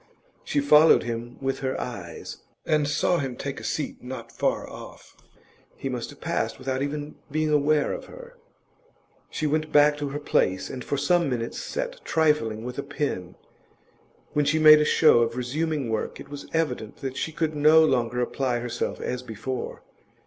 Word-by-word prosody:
She 145 - 0
followed 150 +3 +6
him 120 +1 -5
with 135 0 -2
her 130 -1 -2
eyes, 95 -9 -7 0.3
and 150 -2 +2
saw 155 +4 +1
him 135 -4 -3
take 140 +2 -5
a - - -11
seat 150 - -3
not 125 -2 -7
far 115 - -1
off; - - -12 0.6
he 135 - -4
must 125 -2 -4
have 145 - -13
passed 170 +1 -2
without 130 0 -3
even 145 +1 -4
being 155 +1 0
aware 150 0 +2
of - - -6
her. - - -12 0.9
She 155 - -3
went 155 +1 0
back 150 0 +5
to 145 -1 -2
her 145 +2 -4
place 95 -9 0
and 125 -1 -6
for 145 - -2
some 170 +3 +2
minutes 120 -2 -3
sat - - -4
trifling 150 -9 +1
with 125 +2 -5
a - - +1
pen. 140 -11 -4 1.0
When 150 - +2
she 150 +3 +2
made 155 -1 +8
a - - +2
show 155 -6 +5
of 115 +1 0
resuming 145 +1 -1
work, 110 - -3
it - - -10
was 145 0 -8
evident 130 -9 -1
that 130 -1 -4
she 160 - -2
could 155 -1 -2
no 155 +2 +6
longer 125 -4 +1
apply 125 0 -1
herself 120 0 -3
as 125 - -3
before. 125 +1 -5
140 Hz, 180 wpm, -25 LUFS, 125-155 Hz, 1.0 s, made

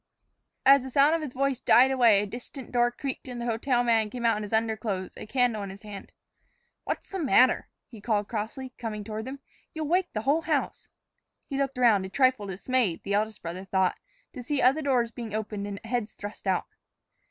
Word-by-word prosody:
As 275 0 +8
the 265 - -7
sound 280 +4 +4
of 330 - 0
his 285 -5 -6
voice 275 -1 0
died 260 +1 +5
away, 230 -6 +5
a - - -2
distant 245 +5 -8
door 240 -1 +3
creaked 265 +2 -6
and 245 -1 -6
the 235 - -4
hotel 240 +2 +1
man 225 -3 +2
came 240 +2 -5
out 230 -1 +4
in 210 - -3
his 210 - -6
underclothes, 220 -4 -1
a - - -9
candle 245 -3 +1
in 200 - -5
his 195 +3 -11
hand. 205 -2 -9 0.7
"What's - - -4
the 385 - -3
matter?" 260 -4 +4 0.2
he 225 -4 -12
called 210 -2 0
crossly, 240 +4 -5
coming 215 -3 -4
toward 215 +1 -5
them. 270 +1 -7 0.3
"You'll 315 -1 -3
wake 360 +3 +1
the 215 - -2
whole 285 +6 +2
house." 305 -4 -2 0.6
He 275 -2 -4
looked 270 -1 -1
around, 215 -6 +4
a - - -11
trifle 255 -2 +2
dismayed, 200 0 -1
the 200 - -2
eldest 215 +1 -1
brother 175 +3 -5
thought, 190 -1 +1 0.3
to 255 - -7
see 280 +3 -1
other 270 +5 +4
doors 250 -5 +1
being 225 -3 -6
opened 210 -2 -4
and 200 -1 -6
heads 230 -2 -2
thrust 205 +1 -8
out. - - +1
235 Hz, 210 wpm, -27 LUFS, 210-265 Hz, 0.7 s, As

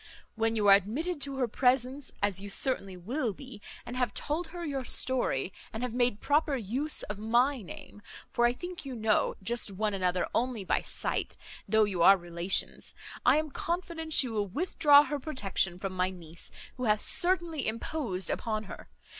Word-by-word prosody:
When 225 0 0
you 210 -2 +1
are 200 - +9
admitted 280 - +1
to 275 0 -3
her 255 -2 +1
presence, 255 +3 +1
as 200 -2 +1
you 200 +1 -7
certainly 195 -5 +2
will 230 - -2
be, 260 -1 -11 0.2
and 245 - -6
have 250 -1 -1
told 320 +4 -2
her 345 0 -7
your 275 -3 -3
story, 240 - +1 0.2
and 220 +2 -5
have 250 -2 -3
made 245 -3 +1
proper 295 0 +2
use 260 +7 -1
of 210 -1 -6
my 240 +5 +2
name 205 +2 -11 0.3
(for 240 0 +3
I - - +2
think 355 +6 -7
you 270 -3 -6 0.5
just 235 +2 0
know 195 - -10
one 210 +1 -1
another 180 -2 0
only 240 -4 -1
by - - +1
sight, - - -2 0.3
though 220 +1 +4
you 195 -5 -1
are 195 +3 +8
relations), 175 +1 -1 0.3
I - - +6
am 310 -1 -2
confident 335 -1 -4
she 275 - +5
will 215 -3 -2
withdraw 290 - +5
her 295 -1 -3
protection 200 - -1
from 195 0 -4
my 185 0 +1
niece, 170 -3 -7 0.3
who 255 - -3
hath 210 -1 +2
certainly 345 -4 +1
imposed 220 - -2
upon 215 -1 -2
her. 200 - -11
240 Hz, 180 wpm, -30 LUFS, 200-285 Hz, 0.5 s, are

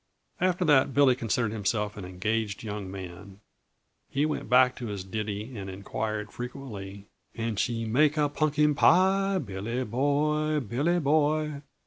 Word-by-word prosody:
After 180 0 +1
that, 135 -3 +4
Billy 140 -2 +6
considered 115 -2 -1
himself 105 0 -1
an 100 - -7
engaged 105 +3 -2
young 105 -3 -5
man. 95 +1 -9 0.7
He 145 +2 +1
went 155 - -3
back 125 0 +5
to 120 - -5
his 100 -3 -5
ditty 105 +4 -4
and 100 -2 -6
inquired 105 +3 -4
frequently: 105 -6 -7 0.3
"Can 115 -1 -2
she 115 +2 -1
make 150 +7 +3
a 150 -1 +3
punkin 150 0 +2
pie, 190 +5 +4
Billy 115 - -3
boy, 150 +5 +1
Billy 145 - 0
Boy?" 150 -1 +1
120 Hz, 140 wpm, -28 LUFS, 105-150 Hz, 0.7 s, Billy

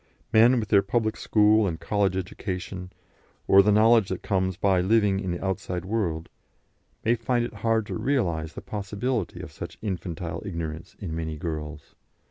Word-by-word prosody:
Men, 120 +3 +6
with 105 -2 -4
their 100 -2 +6
public 110 +2 0
school 105 0 +3
and 80 -3 -3
college 100 -3 0
education, 90 0 -5 0.6
or 95 - +8
the 105 +2 +3
knowledge 110 0 +5
that 95 - -4
comes 95 -2 0
by 95 -3 +3
living 100 0 +3
in 95 -2 -3
the 85 +2 -3
outside 90 -2 -3
world, 90 -6 -1 0.8
may 115 - +4
find 120 0 0
it 120 - -7
hard 110 +1 0
to - - -6
realise 85 - -1
the - - -7
possibility 105 +2 -3
of - - -9
such - - -8
infantile 90 -4 -4
ignorance 85 -5 -5
in 85 -5 -5
many 80 -1 -4
girls. 75 -2 -6
95 Hz, 165 wpm, -26 LUFS, 85-110 Hz, 0.8 s, or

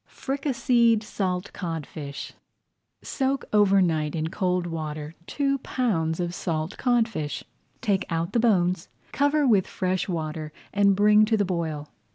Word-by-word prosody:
FRICASSÉED 250 -5 +1
SALT 185 -2 -3
CODFISH 155 -4 -6 0.7
Soak 270 -1 -1
over 200 -2 +5
night 155 -3 0
in 160 0 -2
cold 180 -2 0
water 155 -2 -5
two 275 -1 0
pounds 180 -12 -1
of 175 -1 -2
salt 165 0 -3
codfish. 230 - 0 0.4
Take 200 -5 0
out 165 0 -2
the 235 - +3
bones, 185 -7 +2 0.2
cover 285 +1 +2
with 210 -7 +4
fresh 185 0 -1
water, 155 -2 -3 0.2
and 200 -1 +4
bring 210 +1 +6
to 220 +1 +2
the 205 - +2
boil. 160 -5 -3
185 Hz, 135 wpm, -25 LUFS, 160-225 Hz, 0.7 s, bring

